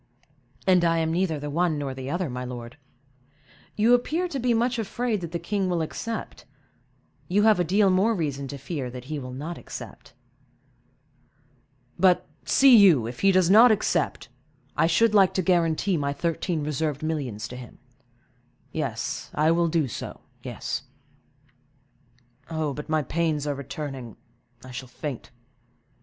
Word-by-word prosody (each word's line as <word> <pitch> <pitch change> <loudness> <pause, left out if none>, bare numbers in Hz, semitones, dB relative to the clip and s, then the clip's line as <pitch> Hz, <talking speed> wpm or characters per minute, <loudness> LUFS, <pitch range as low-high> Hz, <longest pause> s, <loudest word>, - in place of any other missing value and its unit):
"And 185 -2 +4
I 165 -1 +3
am 160 0 0
neither 170 -3 0
the 145 0 -5
one 170 0 +1
nor 140 -2 -3
the 130 0 -6
other, 175 +3 -1
my 125 -1 -5
lord. 120 -1 -7 1.0
You 225 +3 +4
appear 315 +9 +1
to 275 - -3
be 245 0 +1
much 235 +1 +1
afraid 225 -1 -2
that 170 -2 -6
the 170 - -2
king 190 +3 -2
will 170 -2 0
accept; 225 +8 -5 0.8
you 200 +3 +2
have 215 -3 +5
a - - +3
deal 195 +3 +3
more 200 +5 +3
reason 140 -6 -3
to 140 - -6
fear 140 -1 -4
that 125 0 -8
he 150 +2 -4
will 125 -2 -7
not 150 +7 -6
accept." - - -10 1.9
"But, 185 -1 +4 0.2
see 270 -2 +6
you, 180 - +6
if 120 +2 -6
he 195 - +4
does 185 -1 +3
not 225 +4 +8
accept, 215 - 0 0.5
I 165 - +3
should 215 +7 +3
like 195 -3 +5
to 185 - +1
guarantee 175 +1 +2
my 140 -1 -1
thirteen 165 +1 -2
reserved 150 0 -2
millions 130 -9 -3
to 125 - -8
him—yes, 125 +1 -8
I 155 +2 +3
will 170 0 +2
do 160 -3 +1
so—yes. 115 - -6 1.7
But 155 -2 -3
my 155 -1 +1
pains 155 0 -1
are 145 - 0
returning, 135 -4 -7 0.5
I 130 - -10
shall 125 +1 -7
faint. 135 0 -6
160 Hz, 150 wpm, -25 LUFS, 135-190 Hz, 1.9 s, not